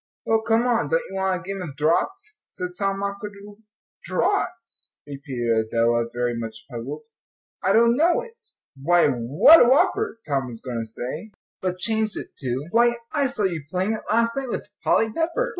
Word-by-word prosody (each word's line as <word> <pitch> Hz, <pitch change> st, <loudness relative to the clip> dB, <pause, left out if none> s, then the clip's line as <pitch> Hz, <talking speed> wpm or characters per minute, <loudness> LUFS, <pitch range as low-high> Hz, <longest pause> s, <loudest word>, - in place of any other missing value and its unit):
"Well, 225 Hz, 0 st, +2 dB
come 225 Hz, +1 st, +2 dB
on, 235 Hz, -2 st, +1 dB
don't -, -, +1 dB
you -, -, -7 dB
want 190 Hz, -1 st, 0 dB
a -, -, -13 dB
game 195 Hz, -1 st, -4 dB
of 155 Hz, -6 st, -7 dB
draughts?" 390 Hz, -, -1 dB
said 180 Hz, -, -4 dB
Tom, 195 Hz, 0 st, -1 dB
awkwardly. 200 Hz, 0 st, -6 dB, 0.5 s
"Draughts?" 230 Hz, -, -2 dB
repeated 120 Hz, -6 st, -2 dB
Adela, 115 Hz, +1 st, +2 dB
very 120 Hz, 0 st, -1 dB
much 115 Hz, -1 st, -6 dB
puzzled. 130 Hz, -, -6 dB, 0.6 s
"I -, -, +2 dB
don't 235 Hz, +1 st, +5 dB
know 335 Hz, +5 st, +3 dB
it." 465 Hz, -1 st, -14 dB, 0.3 s
"Why, 170 Hz, +4 st, +3 dB
what 140 Hz, -, +6 dB
a 240 Hz, -, +4 dB
whopper!" 370 Hz, -, +2 dB
Tom 135 Hz, -3 st, 0 dB
was 115 Hz, -2 st, -8 dB
going 125 Hz, -3 st, -4 dB
to 115 Hz, -, -6 dB
say, 130 Hz, -, -6 dB, 0.3 s
but 185 Hz, -1 st, -2 dB
changed 220 Hz, +2 st, -1 dB
it -, -, -8 dB
to, 130 Hz, +1 st, -3 dB
"Why, 240 Hz, +1 st, +4 dB, 0.2 s
I 285 Hz, -3 st, +1 dB
saw 255 Hz, -5 st, -2 dB
you 175 Hz, -5 st, 0 dB
playing 185 Hz, +4 st, 0 dB
it 220 Hz, -, -4 dB
last 230 Hz, +1 st, +2 dB
night 270 Hz, -2 st, -3 dB
with -, -, -4 dB
Polly 220 Hz, -1 st, +2 dB
Pepper." 335 Hz, -, 0 dB
195 Hz, 180 wpm, -23 LUFS, -, 0.6 s, what